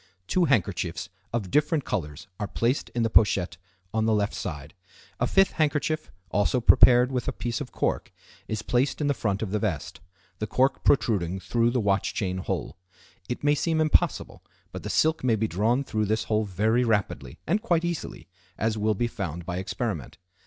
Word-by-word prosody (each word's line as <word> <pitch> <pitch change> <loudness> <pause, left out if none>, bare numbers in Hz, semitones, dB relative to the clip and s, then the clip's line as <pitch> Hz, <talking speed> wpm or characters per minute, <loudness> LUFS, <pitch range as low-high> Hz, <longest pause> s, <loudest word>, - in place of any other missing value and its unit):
Two 180 - +2
handkerchiefs 95 - 0 0.2
of 105 -6 -3
different 150 -1 +2
colors 75 -4 -4
are 105 - -2
placed 120 +7 -1
in 120 - +1
the 115 - +1
pochette 100 -4 +3 0.4
on 110 0 +1
the 110 - +3
left 105 -1 0
side. 75 -5 -6 0.5
A - - +2
fifth 195 -1 +4
handkerchief, 155 0 -1 0.2
also 105 +5 +2
prepared 125 +1 +6
with 125 -2 -2
a - - +1
piece 120 +4 -3
of 125 -4 -6
cork, - - -2 0.4
is 110 -1 -3
placed 125 +2 0
in 150 - 0
the 145 - +2
front 100 -5 -1
of 100 - -4
the 105 - 0
vest, 80 -7 -3 0.4
the 110 - -2
cork 130 +5 +1
protruding 95 -8 +2
through 115 +6 +1
the 125 +1 0
watch 100 -2 0
chain 95 -2 -2
hole. - - -4 0.5
It 125 - -4
may 145 0 +4
seem 160 +2 0
impossible, 155 -1 +1 0.3
but - - -6
the - - -6
silk 160 -1 +2
may 120 -3 +3
be 110 +1 0
drawn 110 +8 +1
through 110 -5 -1
this 110 +2 0
hole 110 0 0
very 110 +5 +1
rapidly, 100 - -1
and 205 +6 +1
quite 175 -7 +1
easily, 165 - -5 0.3
as 110 0 0
will 105 0 +1
be 120 - 0
found 85 -8 -5
by 90 0 -3
experiment. 95 - -4
110 Hz, 190 wpm, -26 LUFS, 100-130 Hz, 0.5 s, prepared